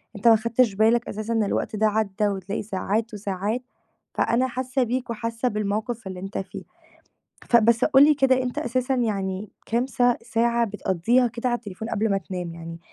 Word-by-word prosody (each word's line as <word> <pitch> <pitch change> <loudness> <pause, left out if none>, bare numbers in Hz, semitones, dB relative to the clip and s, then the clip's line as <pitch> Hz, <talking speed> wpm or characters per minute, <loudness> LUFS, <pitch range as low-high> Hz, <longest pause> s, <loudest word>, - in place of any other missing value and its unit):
أنت 205 +4 0
ما 225 - +9
خدتش 230 0 +2
بالك 225 +3 +3
أساسًا 215 +2 -3
إن 225 -1 +2
الوقت 205 - -2
ده 215 +1 +3
عدّى 210 -1 0
وتلاقي 195 +1 -3
ساعات 210 +3 -2
وساعات، 205 +3 -2 0.5
فأنا 250 +3 +1
حاسة 255 +1 -1
بيك 250 +1 -2
وحاسة 230 +1 -2
بالموقف 215 +1 -2
اللي 185 -1 -6
أنت 195 +2 -6
فيه. 195 - -6 0.8
ف 240 - +3
بس 235 +2 +4
قُل 280 -1 +6
لي 300 0 +5
كده 260 -2 +3
أنت 250 -1 -3
أساسًا 255 +2 0
يعني 200 -4 -2 0.2
كام 235 +3 0
ساع 245 -1 +2
ساعة 235 0 +1
بتقضّيها 210 +5 +1
كده 240 +2 -3
على 240 - +1
التليفون 220 0 -7
قبل 215 +1 0
ما 195 - +2
تنام، 180 -2 -6
يعني 165 0 -8
225 Hz, 180 wpm, -24 LUFS, 200-240 Hz, 0.8 s, ما